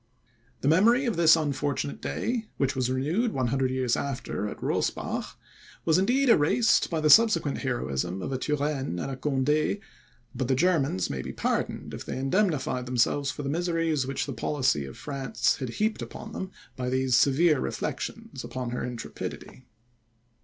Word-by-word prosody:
The - - 0
memory 225 - +5
of 235 - 0
this 165 -1 +6
unfortunate 140 - -2
day, 220 - -2
which 135 -1 0
was 130 -1 0
renewed 160 - 0
100 130 +1 0
years 130 -2 +1
after 130 -6 -3
at - - -6
Rosbach, - - -2 0.5
was 160 +1 +4
indeed 255 +8 +2
erased 230 +4 +4
by 165 - -1
the 155 0 +2
subsequent 195 -11 +5
heroism 90 - -2
of - - -4
a 130 - -2
Turenne 145 - -1
and 135 +8 -4
Conde; 150 +5 +1 0.6
but 125 0 -2
the 130 - +2
Germans 140 - +1
may 65 -2 -3
be - - -6
pardoned, - - -2
if - - -6
they - - -5
indemnified 135 -4 0
themselves 125 +3 +1
for 145 - -5
the 140 - -2
miseries 165 -3 0
which 135 - -2
the 140 - -5
policy 125 - 0
of 65 - -10
France 140 -2 -1
had 130 -3 -4
heaped 215 - -1
upon 220 - -8
them, 190 - -5 0.3
by 125 -1 -3
these 130 -1 +2
severe 145 +4 +4
reflections - - -4
upon 125 -2 -4
her 125 - -3
intrepidity. 125 +1 -7
140 Hz, 160 wpm, -27 LUFS, 130-165 Hz, 0.6 s, this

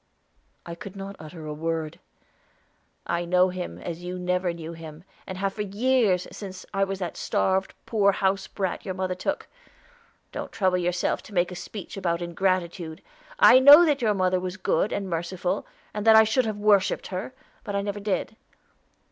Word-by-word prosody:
I 170 - -6
could 185 +3 -9
not 195 0 -7
utter 155 +1 -9
a 150 - -4
word. 160 +1 -3 1.1
"I 170 - -1
know 180 +1 +3
him 180 -1 -5
as 170 0 -6
you 180 +1 -4
never 180 0 0
knew 170 -1 -7
him, 160 -1 -10 0.2
and 185 - -6
have 195 0 -1
for 210 - -4
years, 210 -2 +1
since 190 -3 -8
I 195 - +2
was 195 0 -2
that 180 -3 -4
starved, 190 0 0
poor 205 -3 +3
house 195 0 0
brat 190 -3 -3
your 190 -3 -4
mother 185 0 -1
took. 185 +11 -3 0.8
Don't - - -6
trouble 185 -2 +1
yourself 175 0 0
to 210 - -13
make 175 +1 +2
a - - -6
speech 200 +2 -8
about 170 -3 0
ingratitude. 175 -1 -2 0.3
I 255 - +8
know 290 +6 +10
that 290 -4 +1
your 215 -3 +2
mother 185 -1 +2
was 185 +1 -5
good 195 +1 +1
and 200 -1 -2
merciful, 175 +1 -2 0.3
and 210 - -3
that 220 - +9
I 220 - +9
should 225 +2 +1
have 215 -1 -3
worshiped 205 -2 +2
her; 200 +8 -4 0.3
but 205 -2 -4
I 200 - 0
never 205 0 -3
did. 205 +1 -2
185 Hz, 180 wpm, -26 LUFS, 175-200 Hz, 1.1 s, know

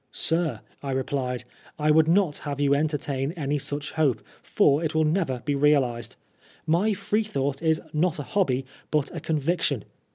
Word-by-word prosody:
" - - -45 0.2
Sir,*' 165 -1 0 0.2
I 140 -1 -3
replied, 130 -2 -2 0.2
" - - -24
I - - +6
would 160 +1 +5
not 175 -3 +3
have 145 -1 -5
you 140 -1 +3
en 150 +2 +3
tertain 140 -1 -2
any 145 -1 -1
such 145 +2 -4
hope, 150 -7 +1 0.2
for 145 +3 +3
it 160 -1 -2
will 160 - +4
never 155 -6 0
be 145 - +1
realised. 135 -5 +2 0.5
My 175 +7 +2
Preethought 195 -9 -1
is 160 -1 +2
not 160 +2 +1
a 145 - -4
hobby, 135 -8 0 0.2
but 150 +1 0
a - - -3
conviction. 150 - 0
150 Hz, 180 wpm, -26 LUFS, 135-160 Hz, 0.5 s, I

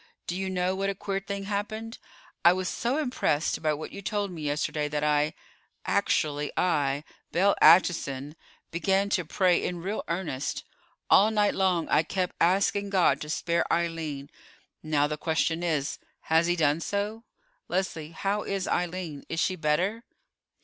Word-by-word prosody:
Do 175 - -3
you 190 0 -2
know 180 0 0
what 195 +1 -1
a 195 - -2
queer 195 0 -2
thing 195 +1 -5
happened? 215 +3 -4 0.4
I 170 - +8
was 185 0 -2
so 245 - -1
impressed 250 - 0
by 155 -1 +2
what 155 - -7
you 200 - -8
told 205 -1 -2
me 165 -3 -7
yesterday 150 0 -1
that 150 0 -2
I, 150 0 +2 0.5
actually 145 -1 +1
I, 145 -5 +1 0.3
Belle 195 +4 +3
Acheson, 150 -4 +4 0.4
began 195 +3 +1
to 180 - +2
pray 180 +2 +2
in 175 -2 -3
real 200 +4 -2
earnest. 165 -5 -3 0.5
All 205 +3 +7
night 210 -2 +2
long 185 -4 +1
I - - +4
kept 180 +2 -2
asking 200 +3 +2
God 190 -3 +3
to 150 - -6
spare 170 +2 0
Eileen; 160 -4 -2 0.5
and 155 - -10
now 145 -1 +4
the 150 +1 -3
question 160 +1 0
is, 155 -5 -1 0.2
has 160 +1 +2
He 175 - +2
done 155 -2 +2
so? 205 +5 -3 0.4
Leslie, 175 -4 -2
how 200 +5 -1
is 195 -2 -3
Eileen? 175 -4 -2
Is 165 - -2
she 185 - +1
better?" 180 +8 0
175 Hz, 165 wpm, -27 LUFS, 155-195 Hz, 0.5 s, I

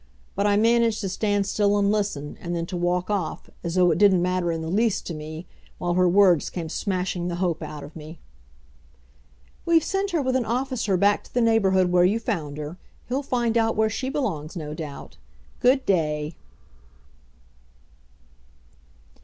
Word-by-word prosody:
But 200 +1 0
I 205 0 +3
managed 230 0 +3
to 195 - -2
stand 205 +1 0
still 205 0 +1
and 200 0 +2
listen, 200 -9 -2
and 175 0 -3
then 165 -1 -2
to 180 - -6
walk 180 +2 0
off, 195 -6 -3
as 170 0 -3
though 180 -1 +4
it - - 0
didn't 195 -4 +5
matter 180 -1 0
in 165 -1 -3
the - - -4
least 210 +4 +1
to 170 - -4
me, 155 +2 -7 0.3
while 175 -1 -1
her 180 0 +3
words 180 -4 +4
came 165 -3 -5
smashing 180 -1 -2
the 175 - -2
hope 175 -2 -1
out 150 -1 -7
of 145 - -11
me. 160 +1 -9 1.5
"We've 335 -2 +3
sent 390 +3 -1
her 340 -5 0
with 260 0 0
an 260 - +2
officer 235 -4 -1
back 200 +2 +3
to - - -19
the - - +3
neighborhood 195 -6 +3
where 180 0 +4
you 195 +5 +3
found 165 -11 -3
her. 150 +4 -6 0.3
He'll 260 +3 0
find 240 -4 -1
out 225 0 +1
where 220 0 +2
she 260 +5 -3
belongs, 195 - -3
no 150 -3 -5
doubt. 150 -3 -8 0.4
Good 260 +2 +3
day." 150 -4 0
185 Hz, 180 wpm, -24 LUFS, 170-225 Hz, 1.5 s, didn't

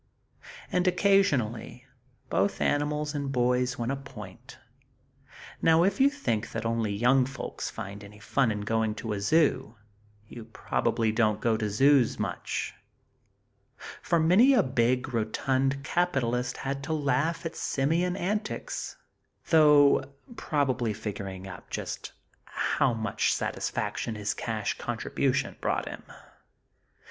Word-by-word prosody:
And, 180 0 +1
occasionally, 140 - +1 0.5
both 95 +3 +1
animal 150 +1 0
and 140 -2 -3
boy 125 -1 +2
won 120 +2 -2
a - - 0
point! 110 -9 -11 1.0
Now 165 +1 +5
if 200 +5 +1
you 275 - +7
think 115 - -3
that 115 0 -3
only 115 -2 0
young 125 +5 +3
folks 135 +1 -5
find 100 -2 -7
any 100 +1 -13
fun 115 +5 +1
in 105 -1 -2
going 110 0 0
to 110 0 -4
a 100 - -3
zoo, 140 -2 +2 0.5
you 115 0 -10
probably 110 0 -1
don't 110 -1 +1
go 115 0 +1
to 110 -1 -2
zoos 135 +3 +4
much; - - -3 1.3
for 170 - +1
many 190 +12 +5
a 225 - +4
big, 125 0 0
rotund 135 +5 0
capitalist 130 -8 0
had 140 +1 -2
to 160 - -2
laugh 155 +3 0
at 165 0 -4
simian 165 +6 0
antics, 210 - -3 0.6
though, 150 -4 +6 0.3
probably 130 - 0
figuring 100 -3 -6
up 90 -3 -10
just - - -5 0.3
how 135 - 0
much 110 -2 0
satisfaction 115 - -3
his 105 0 -2
cash 110 -3 -3
contribution 130 +3 -1
brought - - -1
him. - - -7
125 Hz, 125 wpm, -28 LUFS, 110-150 Hz, 1.3 s, you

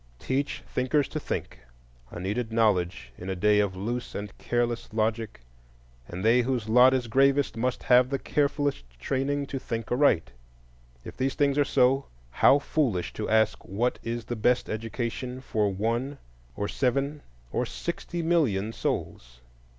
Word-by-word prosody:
Teach 135 - -2
thinkers 135 +3 0
to 155 - -3
think,—a - - -8
needed 110 +5 -2
knowledge 90 - +1
in 90 - -6
a 95 - -1
day 105 +3 +3
of 100 -2 +1
loose 115 +6 -4
and 100 -1 -6
careless 120 -1 -1
logic; 110 - -1 0.7
and 90 +4 -5
they 120 +3 +5
whose 120 -3 -1
lot 125 +3 +7
is 130 -2 0
gravest 135 +3 +3
must 125 +2 -1
have 125 0 +5
the 135 - 0
carefulest 145 - 0 0.2
training 140 - -1
to 140 -1 -4
think 115 -4 -5
aright. 125 - +3 0.7
If - - -9
these 135 +1 0
things 140 -1 +2
are - - +6
so, 135 0 +2 0.2
how 135 - +5
foolish 135 - -1
to 110 - -4
ask 110 -1 +2
what 115 +6 -1
is 115 0 -4
the 120 - -3
best 120 +3 +1
education 115 +3 -4
for 105 -5 0
one 115 +8 -1 0.4
or 100 - -2
seven 140 +5 -1 0.3
or - - -1
sixty 165 - -4
million 115 - +1
souls! - - -4
120 Hz, 150 wpm, -27 LUFS, 105-135 Hz, 0.7 s, lot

